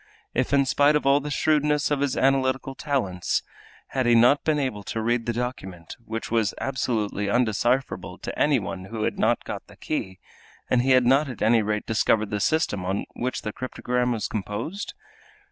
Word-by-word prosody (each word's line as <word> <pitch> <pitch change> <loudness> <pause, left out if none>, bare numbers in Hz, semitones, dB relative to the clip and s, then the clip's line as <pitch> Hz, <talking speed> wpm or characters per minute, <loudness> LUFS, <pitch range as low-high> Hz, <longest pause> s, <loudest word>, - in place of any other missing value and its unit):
If, 130 +1 0
in 140 -1 +4
spite 145 +3 +3
of 150 - 0
all 140 +1 +5
the 145 +1 -5
shrewdness 150 0 +1
of 145 - +1
his 140 -2 0
analytical 135 0 +1
talents, 120 - -1 0.5
he 135 - -1
had 130 - +2
not 125 +5 +5
been 155 -1 +1
able 130 -8 -2
to 110 - -4
read 115 +1 0
the - - +2
document, 105 -8 -5
which 115 0 -5
was 115 -3 +1
absolutely 110 -6 -1
undecipherable 120 +3 0
to - - -6
any 145 -2 +4
one 95 -4 -5
who 110 +2 -4
had - - -2
not - - +2
got - - -6
the - - -16
key, 95 -1 -4 0.5
had 125 - +4
he 130 0 +5
not 135 +4 +3
at 125 - -5
any 115 +1 +4
rate 105 0 -2
discovered 110 -1 +1
the 105 - -1
system 105 - +1
on 95 +2 -2
which 125 +2 -3
the 105 - -4
cryptogram 125 -1 -2
was 115 -3 -1
composed? 115 - -4
125 Hz, 185 wpm, -25 LUFS, 105-135 Hz, 0.5 s, all